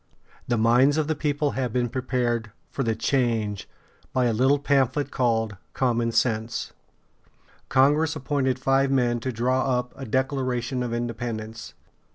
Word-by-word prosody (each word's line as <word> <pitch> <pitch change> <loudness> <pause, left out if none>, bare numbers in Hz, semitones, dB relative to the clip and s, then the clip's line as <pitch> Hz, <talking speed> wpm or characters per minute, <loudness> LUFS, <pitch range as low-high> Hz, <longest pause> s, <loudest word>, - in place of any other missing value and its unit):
] - - -29
The 120 - +3
minds 125 +6 +4
of 155 -2 +1
the 160 - +1
people 145 -1 -1
having 125 -4 -2
been 120 -1 0
prepared 120 -3 -1 0.2
for - - -3
the 115 -3 0
change 115 -5 0 0.4
by 130 -1 +1
a 120 - +2
little 130 +5 +3
pamphlet 140 0 +1
called 115 -5 0 0.2
"Common 120 -2 +1
Sense," 115 -1 -1 1.0
Congress 150 +4 +3
appointed 135 -3 0
five 135 +1 +2
men 120 -3 +2
to 130 +3 -3
draw 130 +2 +1
up 125 0 -4
a 135 - -7
Declaration 130 0 -1
of 120 -1 -2
Independence. 115 -1 -4
125 Hz, 150 wpm, -25 LUFS, 115-135 Hz, 1.0 s, minds